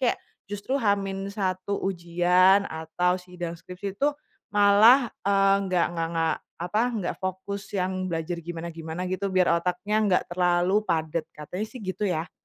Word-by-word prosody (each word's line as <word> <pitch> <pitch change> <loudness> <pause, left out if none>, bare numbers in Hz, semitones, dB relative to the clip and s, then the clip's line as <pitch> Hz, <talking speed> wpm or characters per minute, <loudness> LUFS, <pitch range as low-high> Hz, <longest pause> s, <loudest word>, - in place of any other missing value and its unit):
kayak 250 -2 +2 0.3
justru 205 +5 -5
H-1 195 -2 -1
ujian 180 +1 +3
atau 175 +2 -1
sidang 180 -2 -6
skripsi 180 +3 -7
itu 285 - +4 0.4
malah, 210 +5 +6 0.2
eee, 195 0 +4
nggak 180 -2 +2
nggak 165 -1 -2
nggak 165 -1 +1 0.2
apa 180 +5 -1
nggak 220 -7 -2
fokus 195 +1 -4
yang 185 0 -1
belajar 170 0 -3
gimana-gimana 170 0 -6
gitu, 190 +1 -1
biar 180 -2 +3
otaknya 180 +4 -2
nggak 180 - +3
terlalu 180 +2 +2
padet. 160 0 -1
Katanya 180 +8 -5
sih - - -12
gitu 190 +2 -2
ya. 165 -1 -2
185 Hz, 140 wpm, -26 LUFS, 170-200 Hz, 0.4 s, malah